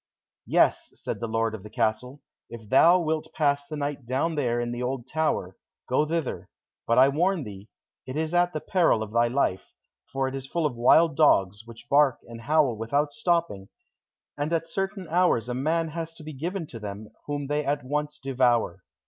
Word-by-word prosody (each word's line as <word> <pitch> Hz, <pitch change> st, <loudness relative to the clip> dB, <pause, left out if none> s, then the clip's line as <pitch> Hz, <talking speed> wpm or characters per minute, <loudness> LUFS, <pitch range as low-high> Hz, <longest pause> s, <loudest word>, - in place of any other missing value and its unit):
"Yes," -, -, +2 dB
said -, -, -5 dB
the 115 Hz, -, -3 dB
lord 115 Hz, 0 st, 0 dB
of 110 Hz, -, -6 dB
the 105 Hz, -, -11 dB
castle, 120 Hz, +4 st, -2 dB, 0.3 s
"if 115 Hz, -2 st, -10 dB
thou 170 Hz, -, +6 dB
wilt 160 Hz, -1 st, -2 dB
pass 145 Hz, -2 st, +1 dB
the 155 Hz, -, -6 dB
night 145 Hz, -1 st, -3 dB
down 130 Hz, +7 st, -1 dB
there 120 Hz, -6 st, 0 dB
in 120 Hz, 0 st, -2 dB
the 120 Hz, 0 st, -4 dB
old 125 Hz, -1 st, -3 dB
tower, 140 Hz, -, -1 dB, 0.3 s
go 140 Hz, +4 st, +1 dB
thither; 165 Hz, -3 st, -3 dB, 0.4 s
but 115 Hz, -, +2 dB
I 130 Hz, +1 st, +8 dB
warn 170 Hz, +4 st, +1 dB
thee, 100 Hz, -1 st, -10 dB, 0.4 s
it 130 Hz, -, -6 dB
is 160 Hz, +1 st, -2 dB
at 175 Hz, 0 st, +3 dB
the 155 Hz, -, -4 dB
peril 170 Hz, -, +2 dB
of 105 Hz, -, -8 dB
thy 120 Hz, 0 st, +3 dB
life, 120 Hz, -7 st, -1 dB, 0.4 s
for 135 Hz, 0 st, -1 dB
it 130 Hz, -, -5 dB
is 135 Hz, -1 st, -6 dB
full 170 Hz, +2 st, -1 dB
of 140 Hz, -5 st, -1 dB
wild 145 Hz, +6 st, +4 dB
dogs, 105 Hz, -8 st, +3 dB
which 115 Hz, 0 st, -12 dB
bark 140 Hz, -1 st, +4 dB
and 115 Hz, -1 st, -10 dB
howl 145 Hz, -1 st, +2 dB
without 140 Hz, +7 st, -1 dB
stopping, 165 Hz, -, -1 dB, 0.7 s
and 145 Hz, +2 st, -3 dB
at 165 Hz, -1 st, 0 dB
certain 195 Hz, +1 st, -3 dB
hours 170 Hz, -9 st, +2 dB
a 125 Hz, -, -3 dB
man 160 Hz, +6 st, 0 dB
has 165 Hz, +1 st, -6 dB
to 160 Hz, -, -12 dB
be 155 Hz, 0 st, -7 dB
given 170 Hz, +6 st, -4 dB
to 120 Hz, -6 st, -9 dB
them, 105 Hz, 0 st, -7 dB, 0.2 s
whom 145 Hz, -1 st, -3 dB
they 145 Hz, +2 st, -1 dB
at 145 Hz, -1 st, -1 dB
once 150 Hz, +2 st, -2 dB
devour." 120 Hz, -8 st, +1 dB
140 Hz, 200 wpm, -26 LUFS, 120-160 Hz, 0.7 s, I